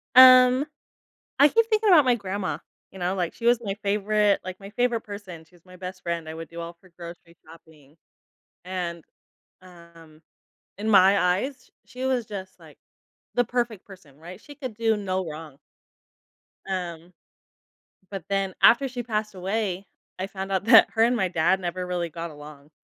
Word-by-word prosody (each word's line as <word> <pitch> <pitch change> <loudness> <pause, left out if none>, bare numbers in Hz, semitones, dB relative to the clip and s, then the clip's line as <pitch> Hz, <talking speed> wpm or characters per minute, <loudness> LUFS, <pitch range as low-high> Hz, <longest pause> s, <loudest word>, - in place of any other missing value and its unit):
Um, 255 +1 +8 0.7
I 285 - +8
keep 460 +7 +3
thinking 435 -1 +2
about 320 -7 +7
my 250 -1 +4
grandma, 190 -7 -4 0.3
you 190 - -12
know, 180 +2 -1
like, 175 -3 -2
she 235 - -9
was 240 0 +4
my 195 -3 -2
favorite, 205 0 +2
like, 185 +1 -7
my 195 0 -10
favorite 240 0 0
person, 200 -6 -9
she 180 - -25
was 175 - -25
my 185 0 -15
best 185 0 -8
friend, 170 -2 -3
I 160 - -6
would 165 0 -8
do 170 0 -9
all 170 - -6
of - - -26
her 185 - -21
grocery 170 0 -11
shopping, 160 -2 -18 0.7
and, 175 -3 -5 0.6
um, 170 -3 -17 0.6
in 210 +2 -3
my 195 0 +6
eyes, 225 +9 -1 0.2
sh - - -28
she 255 +1 -5
was 255 -3 0
just, 190 -3 -8
like, - - -17 0.6
the 245 - +2
perfect 235 -4 -3
person, 170 -8 -16
right? 180 +4 -11
She 290 - -13
could 255 -7 -6
do 225 -1 +1
no 190 -2 -3
wrong. 155 -3 -9 1.1
Um, 175 -2 -5 1.0
but 195 -5 -6
then 195 -1 -1
after 270 +4 +6
she 250 -1 -5
passed 215 -3 -3
away, 190 0 -3 0.3
I 190 - -3
found 195 0 -7
out 190 0 0
that 225 0 +7
her 225 - +2
and 245 +1 +2
my 190 -5 0
dad 180 +3 +1
never 180 +1 -4
really 175 -1 -2
got 170 +1 -6
along, 150 0 -13
190 Hz, 180 wpm, -25 LUFS, 170-225 Hz, 1.1 s, Um